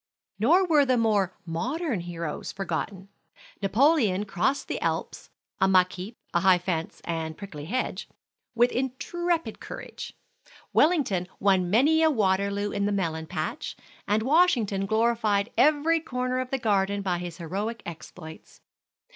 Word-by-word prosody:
Nor 335 - +4
were 285 -7 +4
more 205 -5 +1
modern 240 - -2
heroes 170 -3 -5
forgotten. 190 +1 -4 0.5
Napoleon 215 - +3
crossed 235 +9 0
the - - -3
Alps - - -3 0.3
(a 190 - +4
muck 185 -1 +4
heap, 195 +6 -8 0.2
high 185 +1 +5
fence, 175 -2 -3
and 160 -2 -4
prickly 165 -8 -8
hedge), 255 +10 -3 0.5
with 240 +1 +4
intrepid 325 +7 -2
courage. - - -8 0.6
Wellington 270 - +3
won 190 -3 +3
many 290 - +4
a 320 - +5
Waterloo 200 -4 +1
in 200 0 0
the - - 0
melon 160 -5 -2
patch, - - -4 0.3
and 215 +1 +2
Washington 240 - +3
glorified 220 -1 +1
every 305 +5 +4
corner 255 -4 -2
of 255 -1 -3
the 270 - 0
garden 200 -3 +1
by 180 -3 0
his 175 -1 -6
heroic 200 +7 -4
exploits. 160 -1 -10
205 Hz, 130 wpm, -26 LUFS, 185-255 Hz, 0.6 s, high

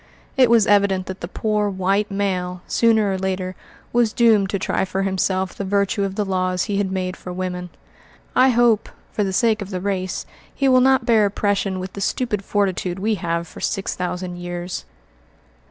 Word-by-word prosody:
It 255 -3 +5
was 230 -3 +5
evident 200 -2 +3
that 190 0 -7
the 170 - -4
poor 210 +1 0
"white 195 +2 0
male," 180 -3 -2
sooner 220 -3 +3
or 190 - -2
later, 185 -1 -2 0.4
was 235 -2 +3
doomed 220 -5 +4
to 200 - 0
try 190 - -1
for 190 +1 -2
himself 190 -1 0
the - - -5
virtue 200 +1 +1
of 195 -1 -2
the 210 - 0
laws 185 -1 0
he 205 - -2
had 195 -2 0
made 185 -1 -2
for 180 - -8
women. 180 0 -4 0.7
I 260 +1 +6
hope, 235 -3 +3 0.2
for 210 - 0
the 195 - -1
sake 220 +2 +2
of 200 - -5
the 185 -2 -3
race, 185 -1 -2 0.3
he 275 - +1
will 255 -1 +5
not 265 +1 +4
bear 220 -3 +4
oppression 200 -1 -1
with 185 +1 -6
the 200 - -6
stupid 210 -2 -1
fortitude 190 -3 -1
we 215 +3 0
have 170 0 -1
for - - -12
six 195 -2 -1
thousand 180 0 -4
years. 175 0 -5
195 Hz, 190 wpm, -21 LUFS, 185-210 Hz, 0.7 s, I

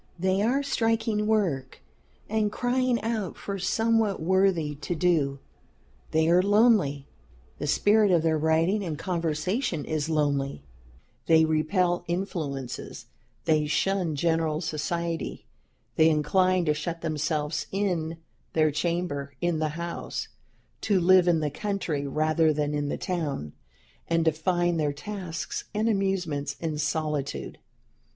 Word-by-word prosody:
They 185 +2 +1
are 255 +6 +2
striking 225 -5 0
work 170 -12 0 0.5
and 215 -1 0
crying 250 +1 +1
out 220 -5 -2
for 200 -1 -5
somewhat 225 +1 +1
worthy 180 -3 +2
to 170 +4 -3
do. 155 -5 +1 0.7
They 160 0 +2
are 175 +2 +5
lonely; 200 - +3 0.5
the 150 - -3
spirit 205 +7 +4
of 170 -3 +3
their 160 -1 +2
writing 165 +6 +2
and 160 -5 -3
conversation 170 - -1
is 155 0 -2
lonely; 140 - 0 0.6
they 160 -1 +6
repel 175 +3 +1
influences; 155 -8 -4 0.4
they 155 -2 +2
shun 180 0 0
general 160 0 +1
society; 165 +1 -3 0.5
they 160 0 +6
incline 180 +4 +2
to 150 - +3
shut 165 +2 -4
themselves 150 -1 -2
in 175 -5 -1 0.4
their 155 -1 +3
chamber 150 -3 -2
in 175 -2 0
the 155 -1 0
house; 170 0 -4 0.5
to 200 -3 +2
live 180 0 +5
in 165 -2 +3
the 150 -1 -1
country 170 -6 -2
rather 155 +2 +2
than 150 0 -1
in 145 -1 -1
the - - -2
town; 150 - -3 0.5
and 165 -1 +1
to 160 - +5
find 175 +1 0
their 145 -2 0
tasks 180 +1 -5
and 215 +2 +1
amusements 190 -9 -1
in 160 -3 -3
solitude. 150 -2 -2
165 Hz, 130 wpm, -27 LUFS, 150-190 Hz, 0.7 s, they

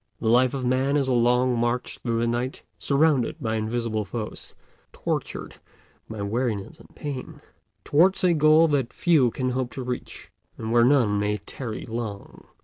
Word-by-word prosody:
The 110 - 0
life 125 +3 +4
of 130 -2 -3
Man 130 +3 +2
is 140 -2 +1
a 130 - +1
long 125 +1 +3
march 120 +1 -1
through 115 -1 -1
the - - +1
night, 120 +3 -2 0.2
surrounded 140 -3 +2
by 110 -2 -2
invisible 110 0 -1
foes, 105 +3 -7 0.4
tortured - - -4 0.5
by 110 -2 -5
weariness 115 +6 -2
and - - -16
pain, 140 -4 -6 0.4
towards 185 +6 +3
a 180 -2 +4
goal 155 +1 +5
that 135 -5 0
few 155 -8 +3
can 130 +2 -2
hope 130 -1 -2
to 130 - -5
reach, 125 0 -6 0.3
and 110 0 -4
where 120 0 +5
none 120 -6 +3
may 105 +1 0
tarry 110 +3 -7
long. 110 -3 -6
125 Hz, 165 wpm, -25 LUFS, 115-135 Hz, 0.5 s, goal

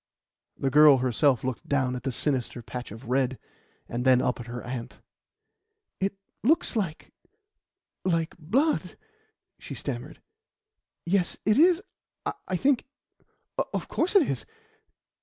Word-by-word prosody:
The 135 - 0
girl 150 0 +8
herself 130 +1 +2
looked 130 -2 -4
down 130 -3 +1
at 125 - -4
the 135 - -2
sinister 125 -2 -1
patch 125 0 -6
of 115 +5 -10
red 130 0 +1 0.5
and 120 +1 -3
then 130 -1 +6
up 125 - 0
at 120 - -7
her 120 0 -6
aunt. 120 -1 -6 1.0
"It 195 +1 0 0.3
looks 315 +2 +2
like 185 -8 -3 0.9
like 165 -3 0
blood," 260 - +1 0.6
she - - -7
stammered. - - -5 0.9
"Yes, 180 0 +1
it 215 +5 +4
is 355 +3 +5 0.6
I 185 - -1
think 270 +4 +2 0.9
of - - -2
course 360 +5 0
it 365 -8 +6
is. 125 -5 -2
140 Hz, 130 wpm, -27 LUFS, 125-200 Hz, 1.0 s, girl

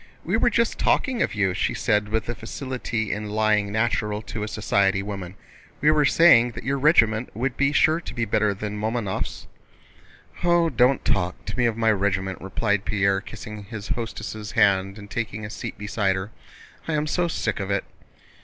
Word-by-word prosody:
"We 180 - 0
were 235 +1 +3
just 235 0 0
talking 255 -3 +1
of - - 0
you," 95 -3 +1
she - - -1
said 105 0 +1
with 110 +1 -1
the 120 - -3
facility 120 -2 -4
in 105 +1 -3
lying 105 -1 +1
natural 110 -1 0
to 105 +1 -6
a 105 - -2
society 100 -2 +1
woman. 100 -3 -6 0.4
"We 150 +2 +4
were 150 -1 +3
saying 125 -7 +6
that - - -8
your 140 +1 -1
regiment 120 -6 +4
would 125 +3 -1
be 140 0 +2
sure 155 +3 +3
to - - -8
be 115 -1 0
better 105 -1 +1
than 105 +1 -5
Mamónov's." 110 -3 -3 1.0
"Oh, 175 -1 +3
don't 125 +1 +3
talk 90 -2 -1
to 100 - -5
me 120 -1 +2
of 115 -1 -2
my 115 -1 +3
regiment," 95 -2 -1
replied 105 +1 -1
Pierre, 100 -2 +1
kissing 105 0 -9
his 105 0 -8
hostess' 110 -2 -5
hand 95 0 +3
and 100 -1 -10
taking 110 -1 -4
a 105 - -7
seat - - -6
beside 105 -2 0
her. 95 +3 -5 0.6
"I 165 - -1
am 150 0 0
so 175 +3 0
sick 115 -9 -2
of 100 -1 -4
it." 100 0 0
110 Hz, 190 wpm, -24 LUFS, 100-125 Hz, 1.0 s, saying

